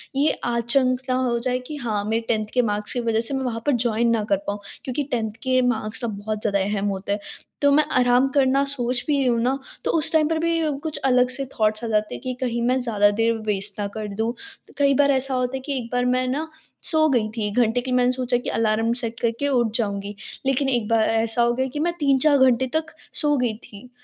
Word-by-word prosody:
ये 290 +3 +3
आचंक 245 +2 +1
ना 255 - +2
हो 250 -2 +1
जाए 250 +1 -1
कि 305 - -6
हाँ 215 -6 -2
मेरे 225 +2 0
10th 215 -2 0
के 250 - +4
मार्क्स 210 -2 -2
की 245 - -1
वजह 225 -1 +1
से 280 - -3
मैं 265 0 -1
वहाँ 230 -2 -2
पर 290 - +3
जॉइन 235 0 +1
ना 220 -2 +1
कर 200 - +3
पाऊँ 205 0 -2 0.2
क्योंकि 270 +3 -2
10th 220 -3 -1
के 255 0 +2
मार्क्स 235 0 -2
अब 210 -3 -4
बहुत 215 +1 -4
ज़्यादा 200 -2 +1
अहम 200 +1 -1
होते 195 +1 -4
हैं। 205 - 0 0.4
तो 285 0 +4
मैं 305 +2 +5 0.2
आराम 245 +2 +4
करना 275 0 +3
सोच 250 -3 -1
भी 290 -2 +2
रही 275 - +1
हूँ 235 -1 +2
ना, 260 +3 +1 0.3
तो - - +1
उस 310 - +4
टाइम 310 -1 +4
पर 325 - +1
भी 335 0 +1 0.2
कुछ 315 -2 -3
अलग 250 -1 +4
से 270 +2 -3
थॉट्स 215 +1 +1
आ - - -2
जाते 215 -1 0
हैं - - -9
कि 255 0 -2
कहीं 235 -2 -1
मैं 255 +1 +2
ज़्यादा 205 -4 +3
देर 225 +2 +1
वेस्ट 205 0 -1
ना 200 - -1
कर 215 -1 -4
दूँ। 225 +2 0 0.4
तो - - -19
कई 280 -1 +4
बार 280 0 +4
ऐसा 265 0 0
होता 255 +1 -1
है - - -6
कि 280 -3 -2
एक 235 -2 -5
बार 245 0 +1
मैं 255 0 +1
ना 295 +5 -2 0.4
सो 315 -1 +3
गई 235 -5 +2
थी, 215 -2 -3
घंटे 240 +1 +2
के 255 0 -5
मैंने 250 0 +3
सोचा 250 -1 0
कि 245 - -5
अलार्म 225 +1 +1
सेट 230 -1 -4
करके 235 +4 -1
उठ 240 -5 +1
जाऊँगी, 200 -2 -3 0.3
लेकिन 270 +1 +1
एक 240 -5 0
बा 230 - +3
अ, - - +3
ऐसा 225 +1 +1
हो 235 0 +3
गया 260 +2 -1
कि 295 - -3
मैं 345 +2 0
3-4 280 +1 +4
घंटे 260 -1 +3
तक 315 0 -2 0.2
सो 295 -1 +2
गई 245 -3 0
थी। 225 +1 -14
245 Hz, 250 wpm, -23 LUFS, 220-265 Hz, 0.4 s, मैं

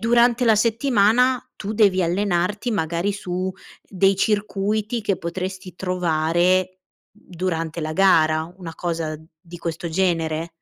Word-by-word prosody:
durante 240 +1 +3
la 220 - +6
settimana 235 +2 +2
tu 210 +2 -5
devi 195 -4 +4
allenarti 190 +5 0
magari 170 +1 -1
su 185 -1 -3 0.3
dei 195 0 +2
circuiti 210 +2 -1
che 195 -4 -1
potresti 185 +2 -5
trovare 180 +1 +1 0.4
durante 170 -5 -4
la 155 - -3
gara, 160 -3 +3
una 170 -4 -8
cosa 165 -3 -3 0.2
di 170 +2 -12
questo 165 0 -4
genere? 165 -2 0
185 Hz, 120 wpm, -22 LUFS, 170-210 Hz, 0.4 s, la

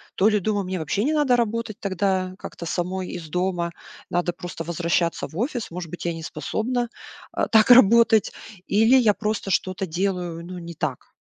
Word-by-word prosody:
То 200 - +4
ли, 210 -1 +2
думаю, 205 +1 -1
мне 185 -1 -3
вообще 160 +7 -1
не 305 +4 +1
надо 290 -5 +3
работать 230 -1 -2
тогда 190 -1 -1
как-то 170 - -8
самой 180 +2 -2
из 165 -3 -7
дома, 180 0 -1 0.4
надо 175 0 0
просто 175 -2 -7
возвращаться 170 0 0
в 160 - -11
офис. 245 0 -2
Может 175 -2 -6
быть, 175 - -7
я 170 - 0
не 165 -1 -7
способна, 240 +6 -2 0.4
а, - - -1
так 220 +1 +5
работать 230 -2 +6 0.4
или 225 +5 +4
я 220 -5 +4
просто 210 -2 -2
что-то 185 +1 0
делаю, 175 -1 -2
ну, 180 0 -7
не 170 0 -8
так. - - -4
190 Hz, 180 wpm, -24 LUFS, 175-220 Hz, 0.4 s, работать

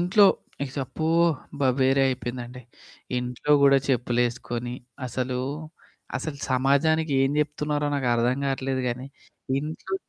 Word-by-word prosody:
ఇంట్లో 185 +4 +5 0.6
అబ్బో! 155 +5 -4 0.4
అబ్బ! 145 - -12 0.2
వేరే 135 +1 +4
అయిపోయిందండి. 125 -1 -4 0.6
ఇంట్లో 125 +4 -1
గూడా 140 -1 +7
చెప్పులేసుకొని 120 -1 0 0.3
అసలు, 125 +1 -2 0.8
అసలు 145 -3 -5
సమాజానికి 140 +4 +2
ఏం 135 - +2
జెప్తున్నారో 150 0 0
నాకర్థం 125 -1 +1
గాట్లేదు 135 -1 -1
గానీ 125 +2 -4 0.5
ఇంట్లో 155 +6 -4
135 Hz, 100 wpm, -25 LUFS, 125-150 Hz, 0.8 s, గూడా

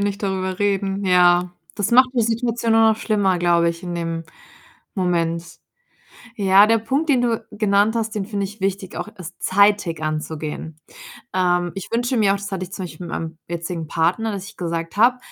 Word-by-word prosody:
nicht 200 0 -2
darüber 190 -1 -2
reden.“ 200 -1 0
Ja, 180 -1 +4 0.2
das 205 - -1
macht 255 +2 +6
die 235 - +2
Situation 230 0 0
nur 225 0 +6
noch 220 - 0
schlimmer, 205 -5 +1
glaube 170 -1 +3
ich, 170 0 -4
in 175 -1 -5
dem 165 -1 -3 0.7
Moment. 170 -3 0 0.9
Ja, 195 0 +6
der 225 +1 +4
Punkt, 270 +8 -1
den 260 -4 +4
du 235 -2 -1
genannt 210 +1 +2
hast, 225 -1 -2
den 205 -2 -2
finde 200 -1 -2
ich 205 +1 -11
wichtig, 195 -1 -2
auch - - -5
es 180 -1 -9
zeitig 200 -4 +2
anzugehen. 155 0 -4 0.5
Ähm, 175 -1 +1
ich 195 - -6
wünsche 245 +2 0
mir 205 -3 +4
auch - - -1
das 200 0 -7
hatte 190 -1 -3
ich 180 - -16
zum 190 - -4
Beispiel 175 +1 -9
mit - - -8
meinem 160 0 -5
jetzigen 170 -1 -4
Partner, 175 +9 0
dass 195 -2 -5
ich - - -16
gesagt 165 -1 -4
habe: 245 +4 +5
195 Hz, 190 wpm, -21 LUFS, 175-215 Hz, 0.9 s, macht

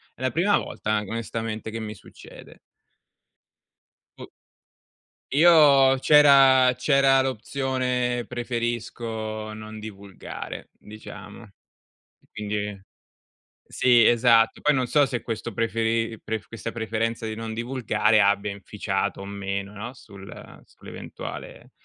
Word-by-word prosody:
È - - -16
la 130 -1 0
prima 185 - +2
volta 105 - -4
an 105 -2 -2
onestamente 115 -1 -4
che 115 +1 -6
mi 105 -1 -6
succede. 95 - -15 1.6
Boh. - - -9 1.0
Io 145 -4 +6
c'era 135 -3 +6
c'era 135 +1 +3
l'opzione 125 -1 -2
preferisco 115 -3 -4
non 110 0 -9
divulgare, 100 -2 -9
diciamo, 105 0 -11
e 100 -5 -22 0.6
quindi 105 -1 -4 0.9
sì, 120 -2 +4
esatto, 115 -1 +4
poi 150 -1 +3
non 130 -2 0
so 145 +2 +3
se 125 -3 -4
questo 115 0 -5
preferi 115 +1 -1
pref 110 -2 -4
questa 115 0 -6
preferenza 115 0 -3
di 110 - -4
non 110 0 -6
divulgare 115 -2 +1
abbia 100 0 +2
inficiato 100 0 -3
o - - -7
meno, 100 0 -5
no, 115 +5 -8
sul 100 -6 -13
sull'eventuale, - - -10
115 Hz, 115 wpm, -24 LUFS, 105-130 Hz, 1.6 s, Io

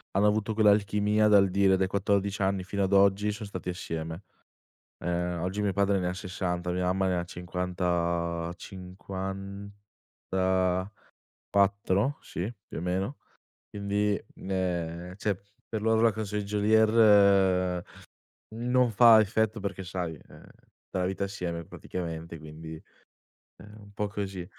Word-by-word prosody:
hanno 100 +2 +4
avuto 105 +1 +1
quell'alchimia 105 0 +3
dal 100 -2 +5
dire 95 0 +4
dai 95 - +2
14 100 +1 0
anni 95 -1 +1
fino 100 +2 -3
ad 95 +1 0
oggi 100 +1 +4
son 105 +1 -6
stati 90 -2 -6
assieme. 80 0 -5 0.8
Ehm, 90 0 -1
oggi 95 +3 -2
mio 100 - +1
padre 100 0 +2
ne 90 - -1
ha 90 - -3
60, 90 -2 -3
mia 90 +1 -1
mamma 95 +1 +1
ne 90 -1 +1
ha 85 - -2
cinquanta 85 -1 -2
54, 95 0 -4 1.1
sì, 95 +7 -5 0.2
più - - -8
o - - -4
meno 95 +9 -2 0.5
quindi, 100 0 0
ehm, 90 -2 -3
cioè 100 -2 -2 0.3
per 110 - -2
loro 110 +1 +2
la 115 -2 +5
canzone 105 -1 -3
di - - -5
Geolier 100 -4 +4 0.7
non 125 +1 +2
fa 115 0 +8
effetto 110 +1 +1
perché 95 -1 -4
sai, 90 -3 -4
ehm, - - -15 0.4
la 90 -1 0
vita 95 +1 -3
assieme 85 -4 -4
praticamente 85 -1 -6
quindi 80 +1 -9 0.8
è - - -15
un 105 0 -14
po' 105 0 -2
così. 100 -3 -4
95 Hz, 135 wpm, -28 LUFS, 90-105 Hz, 1.1 s, fa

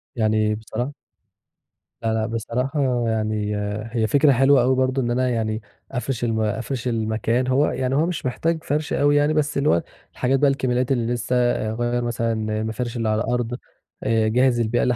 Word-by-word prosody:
يعني 110 -1 +1
بصراحة 110 +5 -4 1.1
لأ، 115 -1 0
لأ 110 0 0
بصراحة 125 +5 -2 0.3
يعني 110 -1 -1 0.4
هي 110 -2 +2
فكرة 145 +4 +4
حلوة 135 +2 +5
أوي 130 +2 +3
برضه 130 +1 +1
إن 120 -1 -1
أنا 125 +1 +1
يعني 110 -2 -1 0.3
أفرِش 125 -1 -3
الم 115 -2 0
أفرِش 115 +4 -2
المكان 115 +2 0
هو 135 +3 +3
يعني 130 +1 -1
هو 155 - +3
مش 175 -5 -3
محتاج 160 +6 -1
فرش 150 +1 -1
أوي 145 +1 +3
يعني، 145 +1 +3
بس 150 -2 0
اللي 140 +2 +2
هو 85 - +3 0.3
الحاجات 135 +2 +1
بقى 145 - +4
الكماليات 130 -1 0
اللي 120 -2 +1
لسّه، 120 +1 -1 0.4
اغيّر 120 +2 -1
مثلًا 115 -1 -1 0.3
المفارش 115 +2 -3
اللي 115 -2 0
على 110 0 +1
الأرض، 120 0 -1 0.5
آآ، 110 -1 +2
اجهز 120 +2 +3
البيئة 115 +1 +1
اللي 125 - +2
120 Hz, 175 wpm, -22 LUFS, 110-135 Hz, 1.1 s, حلوة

